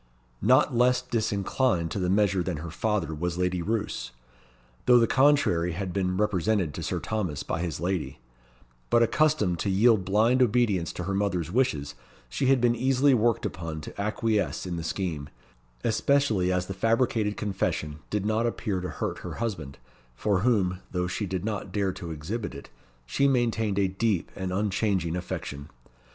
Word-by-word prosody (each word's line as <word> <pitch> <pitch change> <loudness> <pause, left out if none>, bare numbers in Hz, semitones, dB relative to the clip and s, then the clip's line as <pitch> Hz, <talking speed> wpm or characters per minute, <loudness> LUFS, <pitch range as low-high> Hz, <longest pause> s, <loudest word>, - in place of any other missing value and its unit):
Not 130 +6 +4
less 125 +1 +4
disinclined 105 -4 0
to - - -2
the 90 -1 0
measure 95 -1 +2
than 85 -2 -2
her 80 +2 -6
father 100 -3 -1
was 85 +3 -3
Lady 90 -1 0
Roos, 110 +4 -2 0.8
though 125 -1 +8
the 115 - +5
contrary 130 - +3
had 90 0 -4
been 90 -2 0
represented 100 -4 +1
to - - -6
Sir - - -2
Thomas 95 -10 -3
by 80 - -3
his 85 -5 -3
lady; 90 0 -2 0.7
but 120 0 +5
accustomed 115 - +2
to 100 - -1
yield 105 +1 +4
blind 110 +7 +3
obedience 110 -8 +2
to 90 - -5
her 95 +2 -2
mother's 95 -4 -1
wishes, 80 - 0 0.4
she - - -1
had 135 0 +5
been 120 0 +3
easily 130 +3 +3
worked 115 -1 +2
upon 80 -2 -4
to 90 - -7
acquiesce 105 0 0
in 90 -2 -3
the 85 - -4
scheme, 80 -4 -3 0.5
especially 110 -5 +2
as 90 0 0
the 95 - -5
fabricated 115 0 +1
confession 95 -7 -2
did 105 -1 -1
not 110 +2 +1
appear 105 -5 -2
to 90 - -4
hurt - - -4
her - - -7
husband, 80 -12 -4 0.4
for 100 - +1
whom 95 -5 +1
(though 90 -1 -1
she 100 +3 -3
did 95 +1 -3
not 105 -3 -3
dare 100 -3 0
to 85 - -7
exhibit 85 +9 -4
it) - - -11 0.3
she 140 - +2
maintained 115 -6 +1
a 100 -1 +3
deep 95 -1 -1
and 95 -1 -4
unchanging 95 -3 0
affection. 70 -4 -5
100 Hz, 170 wpm, -27 LUFS, 90-115 Hz, 0.8 s, though